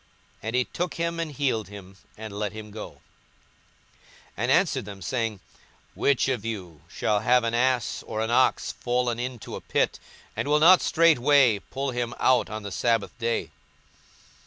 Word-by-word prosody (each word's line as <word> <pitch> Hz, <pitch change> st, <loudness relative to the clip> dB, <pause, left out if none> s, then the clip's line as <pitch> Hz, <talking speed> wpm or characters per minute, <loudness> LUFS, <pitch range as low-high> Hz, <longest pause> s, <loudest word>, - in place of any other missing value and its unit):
And 110 Hz, +3 st, -3 dB
he 125 Hz, -, +3 dB
took 175 Hz, 0 st, -4 dB
him, 170 Hz, 0 st, -2 dB
and 165 Hz, -2 st, -3 dB
healed 130 Hz, -8 st, -1 dB
him, 95 Hz, -1 st, -11 dB, 0.2 s
and 110 Hz, -1 st, -8 dB
let 105 Hz, 0 st, -3 dB
him 105 Hz, -1 st, -9 dB
go; 105 Hz, +1 st, -7 dB
42:014:005 -, -, -25 dB, 1.4 s
And -, -, 0 dB
answered -, -, +2 dB
them, 100 Hz, -1 st, -9 dB
saying, 115 Hz, -3 st, -2 dB, 0.5 s
Which 140 Hz, -2 st, +2 dB
of 125 Hz, -6 st, -1 dB
you 95 Hz, -9 st, -6 dB
shall 105 Hz, -1 st, 0 dB
have 125 Hz, +3 st, +3 dB
an 115 Hz, 0 st, -1 dB
ass 125 Hz, -1 st, +1 dB
or 110 Hz, -, -4 dB
an 110 Hz, +1 st, -1 dB
ox 130 Hz, +2 st, +2 dB
fallen 120 Hz, -1 st, -1 dB
into 125 Hz, -3 st, -5 dB
a -, -, -7 dB
pit, -, -, 0 dB, 0.4 s
and -, -, -2 dB
will 150 Hz, +1 st, +4 dB
not 175 Hz, +4 st, +7 dB
straightway 145 Hz, -8 st, +4 dB
pull 135 Hz, +6 st, -4 dB
him 120 Hz, -1 st, -3 dB
out 130 Hz, -2 st, +3 dB
on 110 Hz, 0 st, -6 dB
the 100 Hz, -, -6 dB
sabbath 115 Hz, +3 st, 0 dB
day? 115 Hz, -1 st, -1 dB
120 Hz, 170 wpm, -26 LUFS, 110-130 Hz, 1.4 s, not